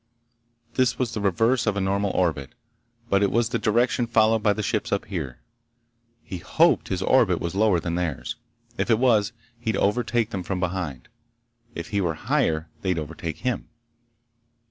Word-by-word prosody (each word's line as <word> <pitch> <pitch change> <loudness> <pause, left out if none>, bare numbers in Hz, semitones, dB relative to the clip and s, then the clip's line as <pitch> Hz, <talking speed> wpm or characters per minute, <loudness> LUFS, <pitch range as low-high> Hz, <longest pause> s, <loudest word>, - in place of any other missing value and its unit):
This 130 -2 +2
was 125 -3 -1
the 105 - -3
reverse 115 +6 +2
of 105 -1 +1
a - - +1
normal 100 +1 0
orbit, 80 - 0 0.5
but 100 -3 +2
it 100 - +3
was 115 +1 +1
the - - -1
direction 120 +2 +2
followed 110 -1 +3
by 105 -1 +3
the 105 +1 -2
ships 105 +1 -1
up 100 - 0
here. 75 -11 -5 0.9
He 90 - -6
hoped - - +3
his - - -2
orbit - - +4
was 85 - -3
lower 100 -2 +3
than 85 0 -3
theirs. 85 -5 -2 0.4
If - - 0
it 115 - +5
was, 115 -4 +3 0.3
he'd 110 -2 -1
overtake 115 +2 +1
them 95 - -3
from 90 +1 -3
behind. 85 -8 -3 0.7
If 85 - -6
he 100 -1 0
were 85 -3 0
higher, 80 0 0
they'd 95 -3 0
overtake 80 +2 -5
him. - - -1
100 Hz, 170 wpm, -25 LUFS, 85-115 Hz, 0.9 s, it